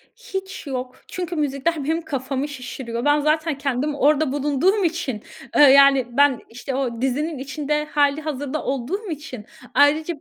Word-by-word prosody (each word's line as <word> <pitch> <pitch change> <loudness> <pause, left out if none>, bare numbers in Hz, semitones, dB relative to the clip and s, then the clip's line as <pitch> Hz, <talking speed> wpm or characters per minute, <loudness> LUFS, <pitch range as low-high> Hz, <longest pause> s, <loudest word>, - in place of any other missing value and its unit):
Hiç 385 -8 -7
yok 255 -1 -5
çünkü 360 -1 -4
müzikler 295 +1 -1
benim 320 +4 0
kafamı 275 -2 -3
şişiriyor. 250 -3 -6
Ben 290 0 +4
zaten 305 0 +1
kendim 280 +1 -1
orada 295 0 +3
bulunduğum 295 +8 +1
için, 320 - -2 0.3
eee, - - +6
yani 275 -2 +7
ben, 285 -3 +5
işte, 245 +3 -5
o 245 -4 -2
dizinin 290 +4 -1
içinde 300 +2 -2
hâlihazırda 290 -1 -1
olduğum 315 - -3
için 290 -8 -7 0.3
ayrıca, 305 +4 +3
290 Hz, 140 wpm, -22 LUFS, 265-315 Hz, 0.3 s, yani